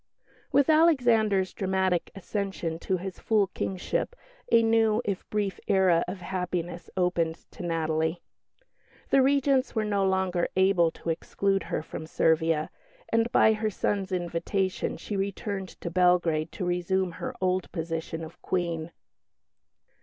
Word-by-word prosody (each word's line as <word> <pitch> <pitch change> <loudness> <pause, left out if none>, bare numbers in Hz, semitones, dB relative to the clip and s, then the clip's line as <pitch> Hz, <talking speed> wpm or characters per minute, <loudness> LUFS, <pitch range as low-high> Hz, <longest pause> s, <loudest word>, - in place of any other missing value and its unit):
With 280 -1 +4
Alexander's 240 - +4
dramatic 190 -2 0
accession 195 -4 -3
to 185 +2 -1
his 185 +1 -7
full 215 -3 +2
Kingship 190 - -2 0.4
a 230 0 +6
new, 225 -1 +3
if 200 -2 -3
brief, 205 -2 -1
era 185 -3 +4
of 185 +1 -6
happiness 175 -1 -4
opened 175 -3 +1 0.2
to - - -10
Natalie. 160 0 -1 0.9
The 275 - +6
Regents 275 -1 +2
were 220 -1 +1
no 200 -2 +1
longer 190 -2 +1
able 190 -3 +4
to 165 - -4
exclude 195 +4 0
her - - -2
from 160 - -7
Servia, 160 -1 +1 0.4
and 230 +1 +1
by 220 - +5
her 215 0 -1
son's 200 -1 -1
invitation 180 +2 -1
she 210 - -5
returned 195 0 -3
to 170 - -4
Belgrade 175 -3 +2
to 185 - -3
resume 180 +1 0
her - - -4
old 185 0 0
position 165 -1 -4
of 160 +1 -11
Queen. 170 -3 -2
185 Hz, 135 wpm, -27 LUFS, 170-205 Hz, 0.9 s, a